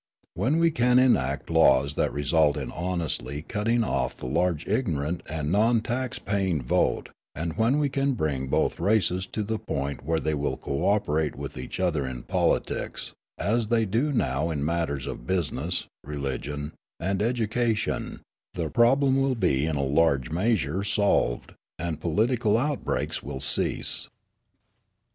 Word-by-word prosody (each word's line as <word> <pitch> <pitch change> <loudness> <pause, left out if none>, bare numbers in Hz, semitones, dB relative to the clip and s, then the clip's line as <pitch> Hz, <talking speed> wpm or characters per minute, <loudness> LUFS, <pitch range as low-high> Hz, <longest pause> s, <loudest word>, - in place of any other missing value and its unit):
When 125 - +1
we 165 0 +4
can 125 -3 +3
enact 130 -8 +2
laws 70 -4 +4
that - - 0
result 75 +1 +2
in 70 - -4
honestly 80 -6 -2
cutting 115 +5 0
off - - -1
the - - -8
large 85 +3 0
ignorant 85 - -1
and 75 0 -2
non 110 +4 +4
tax 125 +2 -2
paying 95 -7 -1
vote, - - +1 0.3
and 80 +1 -3
when 115 +7 +2
we 150 -1 +2
can 140 0 0
bring 70 - -1
both - - 0
races 95 -3 +1
to 105 - -3
the 110 +1 -2
point 70 -1 -4
where 80 +2 0
they 80 0 -1
will 75 -1 -1
co 70 - -2
operate 80 -7 +1
with - - -7
each 65 - -6
other 85 -6 +1
in 60 -2 -6
politics, - - -1 0.2
as 115 +1 0
they 115 0 +2
do 115 +9 0
now 75 - 0
in 75 -3 -2
matters 80 -5 -1
of - - -7
business, 85 -1 -1 0.2
religion, 75 +1 -4 0.3
and 95 +3 -1
education, 115 -1 -1 0.3
the 80 -3 -2
problem 135 +3 +4
will 135 -1 +1
be 70 - +1
in 80 - -1
a 70 - 0
large 70 -2 +2
measure 95 - 0
solved, 100 -11 +1 0.2
and 80 -2 -4
political 110 +6 +2
outbreaks 145 +3 -1
will 70 -1 -6
cease. - - +2
85 Hz, 155 wpm, -26 LUFS, 75-115 Hz, 0.3 s, we